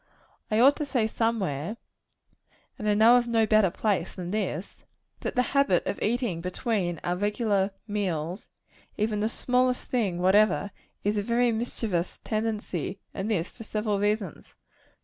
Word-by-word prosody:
I 215 - +2
ought 275 +4 +7
to 300 - -2
say 250 -5 +1
somewhere 215 -5 -1 1.0
and 210 - -1
I 205 - +3
know 225 +3 +7
of 240 -1 +1
no 225 -1 +3
better 215 -3 +4
place 190 -1 -1
than 180 -1 -5
this 195 -4 -3 0.4
that - - -4
the 250 - +3
habit 275 -11 +3
of - - -3
eating 225 -6 0
between 180 - -1
our 175 - 0
regular 205 0 +1 0.2
meals, 185 -3 -3 0.5
even 210 0 0
the 215 +1 +1
smallest 250 +1 +1
thing 210 -8 -1
whatever; 205 +2 +3 0.3
is 210 +1 +1
of 200 - -3
very 240 +1 +2
mischievous 220 -6 -2
tendency; 215 -5 -3
and 195 +3 -3
this 185 -5 -1
for 230 - -11
several 210 -1 -1
reasons. 205 -3 -2
210 Hz, 150 wpm, -27 LUFS, 190-230 Hz, 1.0 s, ought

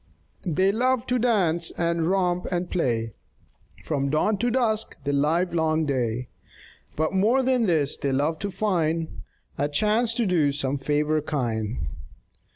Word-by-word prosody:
They 185 +4 +2
love 250 +3 +1
to 250 -1 0
dance 180 -9 +2
and 170 -1 0
romp 180 -1 +1
and 175 0 -2
play 115 -9 0 0.7
From 140 -3 -1
dawn 190 +8 +1
to 240 - +1
dusk 225 -3 0
the 145 - -1
livelong 160 +1 +1
day, 125 -3 -1 0.7
But 160 +3 0
more 225 +8 +3
than 250 -3 +2
this 155 -5 +1
they 140 - -1
love 150 +4 0
to 200 - -3
find 170 -5 -1 0.4
A 145 +1 +1
chance 215 +9 +1
to 235 - +1
do 165 -7 +2
some 140 -1 -1
favor 150 +2 +1
kind. 115 - -2
165 Hz, 145 wpm, -25 LUFS, 145-205 Hz, 0.7 s, more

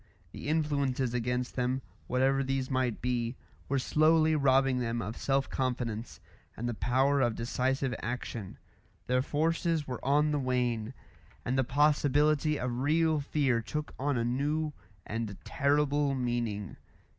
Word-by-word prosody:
The - - -8
influences 140 -5 0
against 125 +1 -1
them, 125 +1 -1 0.2
whatever 135 +2 +2
these 135 0 -2
might 130 -3 0
be, 120 -1 -1 0.3
were 140 - +1
slowly 155 +3 +3
robbing 135 -2 +3
them 120 -1 -1
of 115 0 -4
self 135 0 0
confidence, 120 -3 -3 0.4
and 120 - -3
the 120 - -1
power 130 +6 +2
of 120 -3 +2
decisive 130 +3 -1
action; 115 -4 -5 0.5
their 125 0 +2
forces 160 +2 0
were 125 -2 -5
on 150 +3 +3
the 145 - +1
wane, 125 -2 -1 0.5
and 125 - 0
the 135 - +3
possibility 150 +2 +2
of 125 -1 -2
real 155 +3 +2
fear 140 -4 +1
took 150 +6 -4
on 140 0 0
a 115 - 0
new 150 +5 0 0.3
and 110 -2 -4
terrible 145 0 +1
meaning. 120 -6 -2
130 Hz, 140 wpm, -30 LUFS, 120-145 Hz, 0.5 s, slowly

